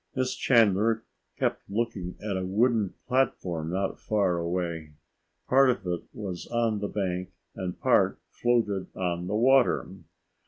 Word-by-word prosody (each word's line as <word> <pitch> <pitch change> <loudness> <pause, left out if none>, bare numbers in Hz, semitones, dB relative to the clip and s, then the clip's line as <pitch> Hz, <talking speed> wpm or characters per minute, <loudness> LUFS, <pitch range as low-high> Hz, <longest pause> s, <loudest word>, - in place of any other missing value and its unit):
Miss 130 -1 0
Chandler 115 -1 +3 0.3
kept - - 0
looking 100 -4 -2
at 105 -2 -2
a 95 - -2
wooden 110 +1 +1
platform 90 -11 0
not 95 -4 -2
far 95 +1 +1
away. 85 -2 -3 0.5
Part 135 +1 +5
of 125 -6 -1
it 90 -1 -3
was 95 -5 -6
on 115 -3 0
the 100 - -2
bank 90 -3 -2 0.2
and 90 -1 -5
part - - +3
floated 115 -6 0
on 90 -1 -2
the 105 - -1
water. 130 +3 +4
100 Hz, 135 wpm, -27 LUFS, 90-115 Hz, 0.5 s, Part